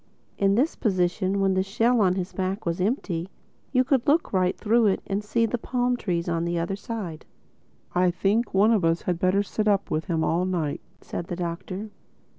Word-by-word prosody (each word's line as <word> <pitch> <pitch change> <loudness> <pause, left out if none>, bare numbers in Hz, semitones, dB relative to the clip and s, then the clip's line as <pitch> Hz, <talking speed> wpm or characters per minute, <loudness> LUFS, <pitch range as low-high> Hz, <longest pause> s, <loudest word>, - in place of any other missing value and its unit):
In 195 0 +3
this 275 +8 +2
position, 185 -1 0
when 195 -1 +2
the 185 - +2
shell 225 +5 +2
on 185 -2 +3
his 185 0 -4
back 190 +3 -2
was 170 +1 -1
empty, 185 - -1 0.4
you 255 -1 +4
could 265 0 +1
look 305 -2 +2
right 185 -1 +2
through 225 +1 +3
it 195 - +2
and 200 +1 -2
see 230 +2 +1
the 235 +2 -2
palm 245 +1 0
trees 175 -7 -2
on 165 -1 0
the 170 0 -1
other 170 +3 -1
side. 200 -7 -6 0.7
"I 180 0 +3
think 205 +6 0
one 205 +4 +4
of 215 -5 +2
us 165 0 +1
had 175 -2 -1
better 185 +3 +2
sit 215 +1 -2
up 200 -1 +1
with 155 +1 -1
him 165 -2 0
all 170 +3 +1
night," 165 -6 -2 0.2
said 170 - -6
the 175 - -4
Doctor. 185 +4 -5
195 Hz, 205 wpm, -25 LUFS, 175-220 Hz, 0.7 s, you